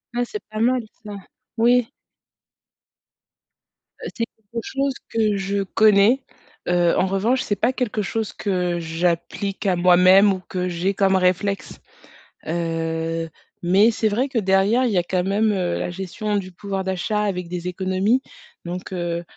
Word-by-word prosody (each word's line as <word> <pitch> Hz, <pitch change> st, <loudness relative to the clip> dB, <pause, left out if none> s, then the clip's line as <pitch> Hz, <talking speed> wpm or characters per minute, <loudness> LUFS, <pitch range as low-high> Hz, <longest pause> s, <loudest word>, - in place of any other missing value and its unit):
Ah, 245 Hz, -, +1 dB
c'est 425 Hz, -, -7 dB
pas 215 Hz, -, -4 dB
mal 245 Hz, +2 st, +2 dB, 0.2 s
ça! 210 Hz, -1 st, -7 dB, 0.4 s
Oui. 240 Hz, +1 st, +4 dB, 2.1 s
Heu, -, -, -5 dB
c'est 230 Hz, -, -1 dB
quelque 220 Hz, +2 st, -8 dB
chose 275 Hz, 0 st, -1 dB, 0.2 s
que 215 Hz, -3 st, +1 dB
je 195 Hz, +1 st, -1 dB
connais. 215 Hz, +5 st, +4 dB, 0.4 s
Heu, 175 Hz, -1 st, +3 dB
en 185 Hz, -, +3 dB
revanche, 215 Hz, +7 st, +1 dB
c'est 205 Hz, -, -1 dB
pas 245 Hz, +5 st, +1 dB
quelque 240 Hz, -5 st, -2 dB
chose 220 Hz, +1 st, -3 dB
que 180 Hz, -3 st, -1 dB
j'applique 170 Hz, +5 st, -2 dB
à 190 Hz, -2 st, +3 dB
moi-même 185 Hz, +3 st, +6 dB
ou 185 Hz, -, -4 dB
que 180 Hz, -1 st, -2 dB
j'ai 180 Hz, +3 st, -1 dB
comme 195 Hz, -1 st, +2 dB
réflexe. 190 Hz, +2 st, 0 dB, 0.7 s
Heu, 165 Hz, 0 st, -2 dB, 0.3 s
mais 195 Hz, +6 st, +4 dB
c'est 220 Hz, 0 st, 0 dB
vrai 245 Hz, +6 st, 0 dB
que 250 Hz, -, 0 dB
derrière, 200 Hz, +5 st, +3 dB
il 240 Hz, -, +1 dB
y 195 Hz, -, +1 dB
a 175 Hz, -, +3 dB
quand 180 Hz, +1 st, -1 dB
même, 210 Hz, +3 st, +1 dB
heu, 180 Hz, -3 st, -1 dB
la -, -, -2 dB
gestion 195 Hz, +3 st, -3 dB
du 185 Hz, -1 st, -5 dB
pouvoir 195 Hz, +1 st, -4 dB
d'achat 190 Hz, +3 st, -1 dB
avec 185 Hz, -4 st, -2 dB
des 180 Hz, 0 st, -4 dB
économies 190 Hz, +6 st, +1 dB, 0.4 s
donc, 180 Hz, +2 st, -6 dB
heu 175 Hz, -1 st, -2 dB
195 Hz, 160 wpm, -22 LUFS, 180-215 Hz, 2.1 s, moi-même